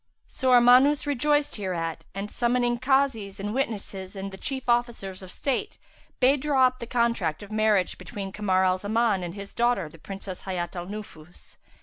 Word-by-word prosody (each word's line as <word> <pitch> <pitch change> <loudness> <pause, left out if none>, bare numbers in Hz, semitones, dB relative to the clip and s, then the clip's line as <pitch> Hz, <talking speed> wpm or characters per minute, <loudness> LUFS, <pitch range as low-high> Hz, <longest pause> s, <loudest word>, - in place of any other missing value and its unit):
So 260 - -2
Armanus 255 +4 +6
rejoiced 290 +1 +1
hereat 170 -5 -3
and, 200 +1 -4
summoning 240 0 +1
Kazis 260 -7 +1
and 205 +2 -3
witnesses 205 -6 -3
and 195 0 -5
the - - -8
chief 265 +4 -4
officers 235 -6 0
of 185 -1 -10
state, 285 - -2 0.4
bade 270 +2 +4
draw 275 -3 +4
up 255 0 0
the 235 - -6
contract 230 -10 0
of 205 - -11
marriage 215 -4 +2
between 195 +2 -6
Kamar 190 -2 +1
al 185 0 +2
Zaman 215 0 +1
and 175 0 -5
his 200 -1 -8
daughter, 235 -8 +1
the 165 - -16
Princess 195 +1 -7
Hayat 180 -2 -3
al 175 0 -5
Nufus. 185 -5 -10
210 Hz, 175 wpm, -26 LUFS, 190-250 Hz, 0.4 s, Armanus